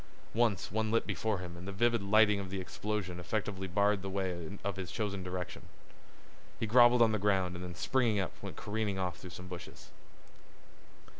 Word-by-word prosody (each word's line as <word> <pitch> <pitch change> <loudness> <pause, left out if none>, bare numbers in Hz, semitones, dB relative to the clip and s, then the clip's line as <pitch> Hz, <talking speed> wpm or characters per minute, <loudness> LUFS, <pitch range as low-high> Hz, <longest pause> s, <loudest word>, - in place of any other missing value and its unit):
Once 110 -5 +1
one 110 +1 0
lit 115 +1 +2
before 110 -2 -1
him 90 -1 -7
and 90 +2 -9
the - - -3
livid 115 +3 +2
lightning 105 0 +5
of 95 -1 -5
the 95 0 -3
explosion 95 -1 -3
effectually 95 +1 -2
barred 100 +2 +2
the 95 - -4
way 95 -1 -1
in 85 +3 -6 0.2
his 95 -2 -5
chosen 100 -4 -2
direction. 90 -1 -5 0.9
He - - 0
groveled 120 +2 +7
on 115 - +4
the 110 - 0
ground 95 -3 +2
and 90 - -6
then 90 -1 -6
springing 120 -1 +2
up 95 - -1
went - - -6
careering 105 -2 -2
off 90 -2 -2
through 90 - -9
some 90 +2 -9
bushes. 90 -1 -9
100 Hz, 190 wpm, -33 LUFS, 90-110 Hz, 0.9 s, groveled